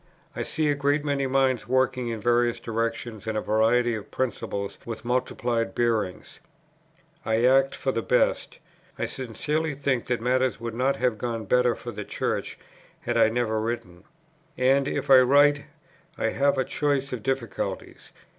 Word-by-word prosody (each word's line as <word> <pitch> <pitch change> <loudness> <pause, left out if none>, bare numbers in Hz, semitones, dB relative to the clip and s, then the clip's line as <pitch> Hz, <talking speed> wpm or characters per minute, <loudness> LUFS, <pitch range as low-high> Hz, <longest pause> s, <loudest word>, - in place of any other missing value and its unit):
I - - -3
see 155 -1 -1
a - - +3
great 145 +1 0
many 140 -2 0
minds 130 -3 +1
working 130 -1 +1
in 115 -1 -3
various 120 +1 +2
directions 115 -1 -3
and 110 -1 -1
a - - +2
variety 115 +3 +2
of 110 -3 -6
principles 100 -5 -3
with 115 0 -7
multiplied 120 -3 -1
bearings; 110 -6 -1 0.8
I 110 +2 +1
act 135 +1 +4
for 135 - -1
the 115 - -2
best. 125 - +1 0.4
I - - -1
sincerely 150 +5 -3
think 135 -3 -1
that 125 -1 0
matters 130 +2 +1
would 115 -1 -5
not 130 +4 +1
have 125 -4 0
gone 115 -2 -3
better 125 +2 +3
for - - -7
the - - -6
Church, - - -3 0.4
had 120 - -2
I 115 -1 +5
never 110 -1 0
written. 95 -6 -5 0.5
And 135 +2 +3
if 140 - -2
I 130 - +10
write 145 +3 +4 0.5
I - - 0
have 140 0 +1
a 130 - +1
choice 140 0 -1
of 125 - -4
difficulties. 130 -3 -4
125 Hz, 165 wpm, -26 LUFS, 115-135 Hz, 0.8 s, I